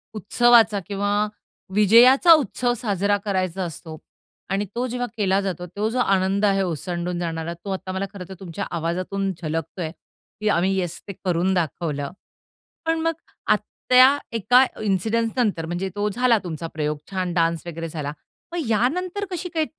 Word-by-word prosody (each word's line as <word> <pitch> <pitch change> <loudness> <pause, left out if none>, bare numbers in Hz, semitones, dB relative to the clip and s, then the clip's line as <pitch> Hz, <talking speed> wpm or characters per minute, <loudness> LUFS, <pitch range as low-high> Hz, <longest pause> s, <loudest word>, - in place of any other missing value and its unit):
उत्सवाचा 225 +1 +4
किंवा 205 +1 0 0.5
विजयाचा 240 - +7
उत्सव 250 -4 +1
साजरा 205 -2 +1
करायचा 185 -2 -1
असतो. 160 -2 -7 0.5
आणि 195 +2 0
तो 245 +2 0
जेव्हा 245 0 -3
केला 195 -2 +2
जातो. 180 -3 -3
तो 205 +5 -2
जो 250 +2 -2
आनंद 195 -1 +2
आहे 195 -1 +3
ओसंडून 175 +1 -3
जाणारा, 165 -1 -3
तो 170 +4 -10
आता 185 0 -5
मला 190 +1 -2
खरंतर 190 -1 -8
तुमच्या 190 +1 -5
आवाजातून 185 +4 -2
झलकतोय. 165 +1 -3 0.5
की 215 - +1
आम्ही 190 +1 +2
येस, 175 -2 -3
ते 200 - -5
करून 180 +1 +1
दाखवलं. 155 -4 -2 0.7
पण 325 0 +1
मग 330 0 +1 0.3
आ - - +6 0.3
त्या 255 +3 +7 0.2
एका 245 +4 +5 0.2
इन्सिडन्सनंतर 215 -1 0
म्हणजे 175 +3 -3
तो 205 +1 0
झाला 245 +1 +3
तुमचा 165 -1 -5
प्रयोग. 150 -1 -1
छान 185 -2 -2
डान्स 165 -1 0
वगैरे 165 0 -5
झाला. 150 -2 -4 0.4
मग 335 -7 -2
यानंतर 360 - 0
कशी 360 0 -4
काय 320 -2 +1
195 Hz, 150 wpm, -23 LUFS, 170-230 Hz, 0.7 s, विजयाचा